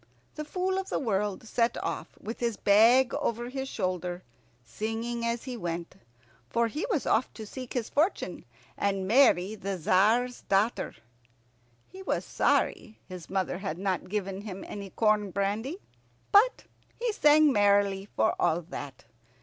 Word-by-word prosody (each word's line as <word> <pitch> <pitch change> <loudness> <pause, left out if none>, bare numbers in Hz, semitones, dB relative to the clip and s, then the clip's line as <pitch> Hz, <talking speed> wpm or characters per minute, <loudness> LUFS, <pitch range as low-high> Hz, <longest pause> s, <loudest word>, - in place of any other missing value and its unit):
The 305 - -5
Fool 370 +5 -1
of 385 - -5
the - - 0
World 210 -2 -1
set 230 +1 +1
off - - -3
with 225 - -6
his 235 -3 -1
bag 230 +5 +5
over 240 +1 -2
his 265 +1 -4
shoulder, 180 -2 -3 0.4
singing 225 - -4
as 235 0 -1
he 255 -2 -5
went, 170 -4 -5 0.5
for 235 0 +2
he 300 - -3
was 315 - 0
off 235 - +2
to 220 - -7
seek 255 +3 -8
his 240 -3 -1
fortune 320 +7 0 0.3
and 195 -2 -1
marry 215 -5 +4
the 195 -2 -4
Tzar's 220 +9 +2
daughter. 200 +4 +1 0.9
He 380 - -12
was 380 - -2
sorry 220 -3 0
his 180 -3 -9
mother 190 -2 -1
had 190 -5 -4
not 190 -1 -2
given 195 -1 -3
him 195 -2 -7
any 200 -1 -7
corn 210 -1 +2
brandy; 205 - -2 0.5
but 445 +5 +5 0.4
he 470 -2 0
sang 300 -4 +5
merrily 200 -1 +3
for 220 - +3
all 165 +2 +2
that. 140 -6 -8
215 Hz, 150 wpm, -28 LUFS, 195-250 Hz, 0.9 s, bag